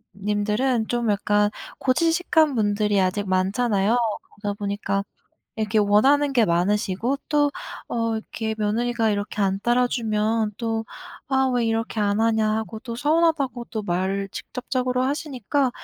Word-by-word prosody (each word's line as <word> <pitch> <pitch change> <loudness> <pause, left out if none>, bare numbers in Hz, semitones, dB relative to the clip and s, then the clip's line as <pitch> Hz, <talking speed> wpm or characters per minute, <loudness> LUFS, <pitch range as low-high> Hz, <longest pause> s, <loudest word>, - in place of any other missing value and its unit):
님들은 210 +4 0
좀 240 -2 0
약간 205 0 +2 0.3
고지식한 320 +1 +2
분들이 205 -1 +1
아직 195 +2 0
많잖아요. 200 +3 +1 0.4
그러다 205 -1 -1
보니까 200 -1 -2 0.5
이렇게 215 0 0
원하는 265 +8 +4
게 240 -4 +4
많으시고 200 +8 0
또 290 -1 +3 0.4
어, 230 -1 -1
이렇게 220 0 -4
며느리가 225 +2 0
이렇게 205 0 -2
안 195 0 0
따라주면 225 -2 +1
또 225 -1 -2 0.4
"아, 265 -1 +2
왜 240 -2 +1
이렇게 225 0 -1
안 205 +1 +1
하냐." 220 -1 +2
하고 220 0 -4
또 235 -2 -6
서운하다고 295 -4 +1 0.2
말을 190 +2 -1
직접적으로 250 0 -2
하시니까 275 -1 -1
225 Hz, 305 characters per minute, -23 LUFS, 205-250 Hz, 0.5 s, 원하는